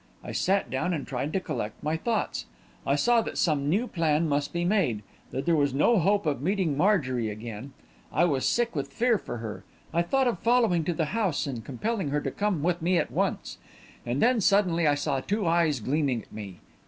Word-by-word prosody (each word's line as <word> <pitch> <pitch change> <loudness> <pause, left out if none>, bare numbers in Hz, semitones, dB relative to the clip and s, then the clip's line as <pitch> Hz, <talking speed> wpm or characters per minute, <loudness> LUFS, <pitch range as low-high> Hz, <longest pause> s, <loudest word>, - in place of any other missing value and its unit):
I - - -6
sat 195 +1 0
down 170 +7 0
and 145 - -4
tried 135 +3 -3
to 190 - +2
collect 110 - -5
my 155 +1 0
thoughts. 220 +6 -2 0.4
I 140 - +3
saw 235 +10 +3
that - - -5
some 145 -4 +1
new 205 +9 +2
plan 165 -6 +1
must 145 -1 0
be 175 0 -1
made 175 - +1 0.3
that 135 - -4
there 170 -1 +3
was 145 -3 +1
no 220 +10 +4
hope 200 +3 +2
of 145 -4 -1
meeting 180 -2 0
Marjorie 135 - +1
again. 110 +5 -7 0.4
I 175 - +3
was 140 -6 0
sick 235 -4 +1
with 140 -1 -3
fear 230 - +2
for 120 - -6
her; 110 -2 -6 0.3
I 170 - +3
thought 265 +10 +1
of 230 -7 -1
following 230 -8 +3
to 175 - 0
the 160 - 0
house 200 -9 0
and 125 -5 -5
compelling 190 - -2
her 145 +1 0
to 135 - -3
come 200 -5 -1
with 175 0 0
me 175 +2 +2
at - - 0
once. - - -2 0.4
And 125 +4 -1
then, 245 -2 +3
suddenly, 180 -5 +3
I 145 - +4
saw 140 -1 -1
two 205 +8 -2
eyes 165 -4 +2
gleaming 130 -1 0
at - - -20
me. 100 -4 -8
160 Hz, 215 wpm, -27 LUFS, 140-195 Hz, 0.4 s, no